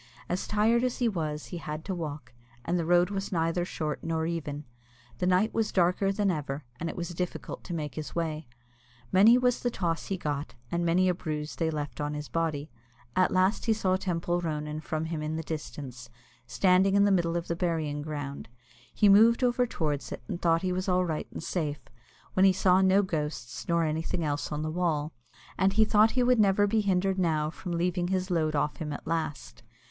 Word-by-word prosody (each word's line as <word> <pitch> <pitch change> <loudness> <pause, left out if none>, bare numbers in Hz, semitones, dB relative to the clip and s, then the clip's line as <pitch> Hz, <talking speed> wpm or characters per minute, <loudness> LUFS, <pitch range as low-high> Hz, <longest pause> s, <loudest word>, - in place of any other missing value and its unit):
As 180 - -2
tired 225 +3 +3
as 250 -1 0
he 245 - +1
was, 155 -7 -2
he - - -2
had 155 -1 -6
to 195 - -2
walk, 150 -8 -6 0.3
and 175 +1 0
the 165 - -2
road 175 +2 +4
was 195 -1 -3
neither 165 0 0
short 155 -4 -4
nor 160 -1 -1
even. 155 -3 -3 0.6
The 180 - +1
night 185 +4 +3
was 225 -2 0
darker 180 +2 +2
than 195 -1 +1
ever, 145 -3 -4
and 165 - -2
it - - -6
was 175 -1 -4
difficult 180 +1 -5
to 180 - -5
make 150 -4 -4
his 155 +3 -6
way. 160 -3 -2 0.6
Many 215 +6 +7
was 250 -1 +2
the 245 - 0
toss 170 -7 -2
he 195 - -2
got, 145 -3 -4 0.2
and 170 0 0
many 175 +2 +3
a 180 - +3
bruise 155 -3 -4
they 165 -1 0
left 150 -2 -4
on 150 0 -2
his 150 0 -6
body. 155 -4 -2 0.4
At 185 - +4
last 185 +3 +2
he 225 - +3
saw 190 -4 +1
Teampoll 175 -2 -1
Ronan 150 -2 -3
from 155 0 -3
him 160 -1 -3
in 155 +1 -2
the 160 - -3
distance, 135 -6 -7 0.4
standing 190 +7 +3
in 200 - +5
the 205 - +3
middle 170 -2 +2
of 170 - -4
the 170 - -1
burying 160 -4 -1
ground. 145 -3 -5 0.4
He 210 - +3
moved 225 +5 +6
over 245 0 +2
towards 150 -8 -2
it, - - -6
and 175 - -4
thought 165 0 +2
he 185 -1 0
was 185 +2 -2
all 180 0 +3
right 160 -3 -3
and - - -7
safe, 155 -4 -2 0.5
when 185 - +3
he 195 -1 +6
saw 185 0 +4
no 190 +1 +4
ghosts 150 -8 -4
nor 170 -1 +2
anything 160 +2 -1
else 145 -1 -2
on 150 0 -2
the 155 - -2
wall, 160 -3 -1 0.5
and 195 0 +3
he 220 +1 +5
thought 215 +1 +5
he 250 - +4
would 250 -1 +4
never 205 0 +4
be 215 +2 +2
hindered 190 -1 +1
now 155 -3 +1
from 175 +1 -6
leaving 175 +1 0
his 185 0 -1
load 155 -3 +1
off 150 +1 0
him 150 -2 -4
at 145 - -6
last. 160 -6 -3
170 Hz, 215 wpm, -28 LUFS, 155-190 Hz, 0.6 s, Many